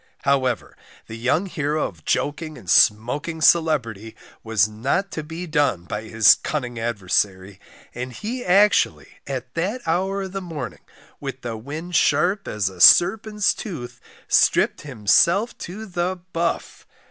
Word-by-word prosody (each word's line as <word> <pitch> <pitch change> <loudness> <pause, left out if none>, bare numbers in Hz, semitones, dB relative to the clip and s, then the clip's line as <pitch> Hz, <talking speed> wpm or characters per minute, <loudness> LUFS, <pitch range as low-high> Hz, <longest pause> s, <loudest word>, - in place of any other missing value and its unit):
However, 130 -4 0 0.3
the 110 - -9
young 125 - 0
hero 155 -4 -2
of 80 -5 -14
joking 155 +1 -2
and 95 - -14
smoking 125 - +2
celebrity, 125 - +1 0.3
was 110 -3 +2
not 130 - -2
to 155 - -4
be 160 +4 -7
done 145 - 0
by 105 +4 -6
his 110 -2 +6
cunning 125 -6 -4
adversary, 100 -3 -2 0.3
and 125 +1 -5
he 235 - -5
actually, 200 +3 +2
at 130 -2 -5
that 190 +9 -2
hour 190 +4 0
of 190 - -7
the 195 0 -5
morning, 160 -8 -7 0.4
with 135 -2 -6
the 120 -2 -5
wind 155 +10 -7
sharp 190 +5 +2
as 105 -3 -1
a 95 -2 -6
"serpent's 210 - +5
tooth," 155 - -8 0.3
stripped - - +3
himself 150 - +2
to 205 +5 -7
the 180 -1 -2 0.2
buff. 170 +1 -3
145 Hz, 140 wpm, -22 LUFS, 115-175 Hz, 0.4 s, his